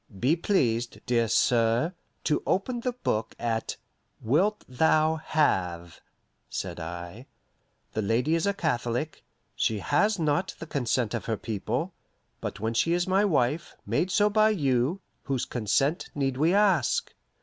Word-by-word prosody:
"Be 135 - +3
pleased, 120 - 0
dear 115 -2 +2
sir, 115 +7 +2 0.3
to 150 - +1
open 240 +6 0
the 250 +1 -2
book 110 - -2
at 115 -1 -2 0.4
'Wilt 180 - +1
thou 155 +4 +3
have,'" 90 - 0 0.5
said - - -4
I. 85 - -7 0.7
"The 110 - -1
lady 115 +9 +1
is 165 +4 +1
a 200 - +2
Catholic; 125 -3 -2 0.3
she 110 - +1
has 195 - +2
not 165 +2 0
the - - -7
consent 125 -6 -1
of 120 - -3
her 110 -2 -1
people; 115 - -3 0.5
but - - -5
when 110 +2 -1
she 140 +9 +2
is 175 0 +1
my 190 +2 +3
wife, 155 -4 0
made 180 - 0
so 205 +2 +3
by 215 +1 +4
you, 145 - +1 0.2
whose 130 -2 -2
consent 130 - 0
need 135 -2 0
we 155 +6 +2
ask? 200 -3 +2
140 Hz, 145 wpm, -27 LUFS, 115-175 Hz, 0.7 s, by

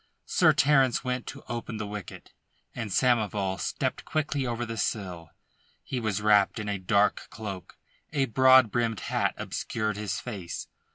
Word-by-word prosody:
Sir - - +4
Terence 135 -3 +3
went 125 -1 -2
to - - -8
open 115 -2 -4
the 105 - -3
wicket, 105 -1 -8 0.4
and 115 -3 -4
Samoval 105 -5 +1
stepped - - -2
quickly 145 -3 -1
over 120 0 -2
the 115 0 -5
sill. 90 -6 -3 0.5
He 130 - -3
was 105 -3 -2
wrapped 105 +1 +4
in 110 -2 -4
a 100 -1 -2
dark 100 +3 +2
cloak, 100 -4 -7 0.3
a 140 -3 +1
broad 130 -1 +6
brimmed 115 -3 0
hat - - 0
obscured 110 -3 -3
his 105 -1 -3
face. 100 -8 -6
110 Hz, 155 wpm, -28 LUFS, 100-125 Hz, 0.5 s, broad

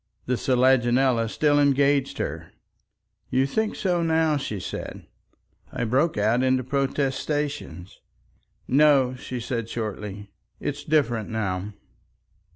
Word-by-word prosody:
The 125 - -1
selaginella 125 -2 +2
still 145 +4 +2
engaged 140 -1 +2
her. - - -5 0.8
"You 130 +1 +2
think 220 +10 -1
so 180 -3 0
now," 160 -1 +2
she 110 -8 -3
said. - - -7 0.7
I - - -3
broke 135 +7 +1
out 110 +4 +2
into 130 0 +2
protestations. 140 - -2 0.7
"No," 135 -2 +4
she 125 0 -6
said 115 -1 -4
shortly. 105 -3 -5 0.3
"It's 145 0 -4
different 120 -8 +1
now." 105 -2 -3
130 Hz, 110 wpm, -25 LUFS, 115-145 Hz, 0.8 s, No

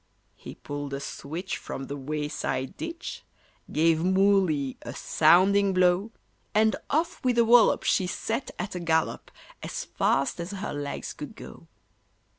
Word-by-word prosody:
He - - -10
pulled 145 -1 -5
a - - -4
switch 160 +6 -5
from 135 - -6
the 140 +2 -5
wayside 145 -2 -3
ditch, 335 +1 -6 0.5
Gave 160 +1 +3
Moolly 190 -7 +2
a - - -7
sounding 190 +5 +4
blow, 185 +3 +3 0.5
And 220 +1 +4
off 330 +3 -1
with 250 -2 +1
a 235 - +5
wallop 235 0 +5
she 185 - +2
set 225 +7 -3
at 210 - -4
a 180 - -4
gallop, 160 -2 0 0.3
As - - -5
fast 140 +5 0
as 170 +1 -4
her 200 +1 -4
legs 145 -1 -4
could - - -8
go. - - -12
180 Hz, 145 wpm, -27 LUFS, 150-205 Hz, 0.5 s, a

